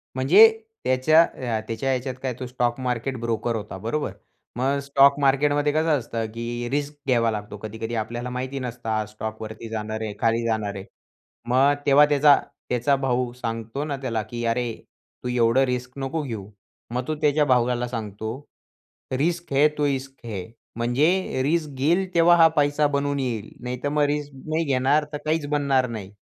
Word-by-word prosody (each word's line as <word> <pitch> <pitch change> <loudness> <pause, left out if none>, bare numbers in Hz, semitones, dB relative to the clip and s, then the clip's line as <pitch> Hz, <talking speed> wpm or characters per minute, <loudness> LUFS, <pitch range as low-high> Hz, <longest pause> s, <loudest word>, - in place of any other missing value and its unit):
म्हणजे, 135 - +8 0.4
त्याच्या 130 +6 +5
अ, 120 -8 -3
त्याच्या 115 +4 -2
ह्याच्यात 130 0 -1
काय 130 -2 -1
तो 130 - -4
स्टॉक 120 0 -1
मार्केट 125 +1 -2
ब्रोकर 115 0 -1
होता, 105 -3 -5
बरोबर 115 +10 -2 0.4
मग 135 +3 0
स्टॉक 140 0 +5
मार्केटमध्ये 145 +1 +2
कसं 155 -1 +2
असतं, 115 -1 -4
की 120 +1 -4
रिस्क 145 +1 -2
घ्यावा 115 -3 +3
लागतो. 105 -1 -5
कधी-कधी 110 +2 -5
आपल्याला 120 +3 -3
माहिती 130 +2 -4
नसतं, 120 -2 -5
हा 110 -1 0
स्टॉकवरती 110 +1 -7
जाणार 110 0 -4
आहे, 110 -2 -3
खाली 115 0 +2
जाणार 110 -3 -1
आहे. 95 0 -7 0.6
मग 135 +3 +4
तेव्हा 145 +1 +7
त्याचा 145 0 +6 0.3
त्याचा 125 +3 +2
भाऊ 125 -2 0
सांगतो 115 +2 -4
ना 145 - -2
त्याला, 115 -4 -1
की 120 +2 -6
"अरे 115 0 0 0.5
तू - - -3
एवढं 125 +1 +3
रिस्क 125 0 -3
नको 135 +4 -2
घेऊ." 110 -8 -6 0.4
मग 125 +1 -2
तो 155 - -1
त्याच्या 150 0 +3
भावाला 125 -2 +2
सांगतो 110 -2 -5 0.9
"रिस्क 170 +2 -1
है 140 +2 +6
तो 150 - +1
ईस्क 135 -2 -3
है." 100 -6 -5 0.3
म्हणजे 135 +7 +1
रिस्क 155 +2 +1
घेईल 170 +8 +2
तेव्हा 170 +1 +6
हा 165 -1 +8
पैसा 145 0 +3
बनून 140 0 -1
येईल, 115 -5 -3
नाहीतर 125 +3 -3
मग 150 0 +2
रिस्क 145 0 -2
नाही 160 +1 0
घेणार, 140 +2 +2
तर - - -1
काहीच 155 -1 0
बनणार 140 -3 +2
नाही. 105 -4 -7
130 Hz, 170 wpm, -24 LUFS, 115-145 Hz, 0.9 s, म्हणजे